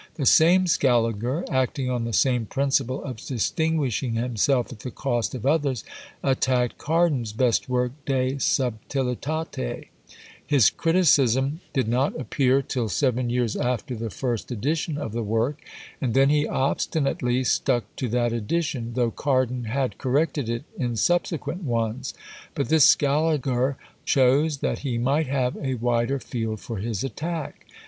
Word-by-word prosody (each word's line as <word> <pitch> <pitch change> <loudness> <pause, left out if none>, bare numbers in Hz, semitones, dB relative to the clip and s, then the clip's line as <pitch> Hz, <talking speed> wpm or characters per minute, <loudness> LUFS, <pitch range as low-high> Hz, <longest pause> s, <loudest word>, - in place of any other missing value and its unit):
The 145 -5 -2
same 175 +7 +6
Scaliger, 125 - +1
acting 130 0 0
on 120 -2 -1
the 115 - -3
same 120 +1 +2
principle 135 -1 0
of 130 -5 -6
distinguishing 135 -1 -1
himself 120 +2 +1
at 110 - -13
the 125 - -6
cost 120 -2 -2
of 125 - -6
others, 140 - +1 0.4
attacked 130 -2 +1
Cardan's 150 -8 +1
best 120 +2 +1
work 125 -1 +1 0.2
De 130 0 0
Subtilitate: 130 - -2 0.5
his 140 -8 +4
criticism 145 -5 +2
did 130 -6 0
not 125 +5 0
appear 135 0 +1
till 120 -4 -2
seven 125 - 0
years 120 -2 0
after 125 +2 -2
the 115 0 -4
first 120 0 -3
edition 145 +6 -1
of 115 - -4
the 115 +2 -2
work, 115 +7 -1 0.4
and 125 -4 -1
then 135 +1 +5
he 150 0 +2
obstinately 130 -2 0
stuck 125 -1 +1
to 125 - -2
that 120 0 +1
edition, 120 0 -2
though 120 -2 +1
Cardan 130 -3 0
had 130 +3 -2
corrected 140 -1 0
it 115 0 -2 0.2
in 120 -3 -1
subsequent 175 - 0
ones; 120 - -2 0.4
but 140 - -2
this 155 -3 +6
Scaliger 140 -3 +2 0.3
chose, 140 +3 +3
that - - -1
he 130 -5 -2
might 140 +6 +1
have 130 -2 0
a 130 -2 -2
wider 120 +3 0
field 115 -4 -4
for 115 +1 -6
his 105 0 -3
attack. 160 +3 -5
130 Hz, 145 wpm, -24 LUFS, 120-140 Hz, 0.5 s, same